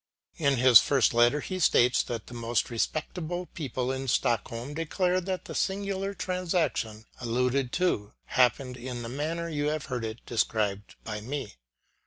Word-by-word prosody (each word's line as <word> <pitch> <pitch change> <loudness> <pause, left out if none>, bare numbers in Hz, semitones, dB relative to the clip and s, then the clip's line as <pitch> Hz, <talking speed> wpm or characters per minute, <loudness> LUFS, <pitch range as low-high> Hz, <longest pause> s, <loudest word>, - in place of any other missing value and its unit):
In 140 -5 +2
his 125 -1 +9
first 135 -6 +3
letter, 120 +5 +4
he 185 +4 -4
states 125 -7 +4
that 115 -3 -5
the - - -11
most 120 0 -1
respectable 160 +8 -2
people 130 -6 -3
in 135 0 -4
Stockholm 115 +2 0
declare 180 +3 0
that 185 -1 -4
the - - -7
singular 195 0 -1
transaction 170 - -1
alluded 125 +2 0
to 140 - 0
happened 125 0 +2
in 120 -1 -5
the 115 - -5
manner 160 +6 -2
you 150 -2 -1
have 155 0 -1
heard 115 -2 -3
described 105 -3 -1
by 105 -1 -5
me. 135 0 -5
130 Hz, 150 wpm, -28 LUFS, 120-165 Hz, -, his